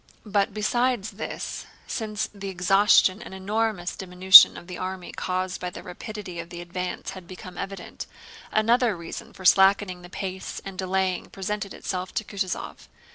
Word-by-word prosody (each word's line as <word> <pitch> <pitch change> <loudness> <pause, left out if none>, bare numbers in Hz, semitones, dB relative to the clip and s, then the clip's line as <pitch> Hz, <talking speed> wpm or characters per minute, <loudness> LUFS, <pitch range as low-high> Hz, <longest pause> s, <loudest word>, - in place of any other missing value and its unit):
But 205 -1 +1
besides 230 +1 0
this, - - -6 0.2
since 215 -3 -3
the 200 -1 -6
exhaustion 195 +2 +4
and 190 - -9
enormous 200 -1 -1
diminution 185 0 +8
of - - -10
the 180 0 -8
army 185 -1 -5
caused 185 0 -3
by 180 - -2
the - - -10
rapidity 185 -1 -7
of 170 0 -7
the 175 - -8
advance 180 +1 -5
had 185 -2 -10
become 185 0 -10
evident, 195 -2 -7 0.4
another 230 -1 +2
reason 170 -1 -8
for 185 - -12
slackening 190 -1 +4
the 175 - -12
pace 190 0 -5
and 195 -1 -7
delaying 185 0 -1
presented 200 +1 -4
itself 185 -1 -5
to - - 0
Kutúzov. 195 -3 -5
190 Hz, 155 wpm, -25 LUFS, 180-205 Hz, 0.4 s, diminution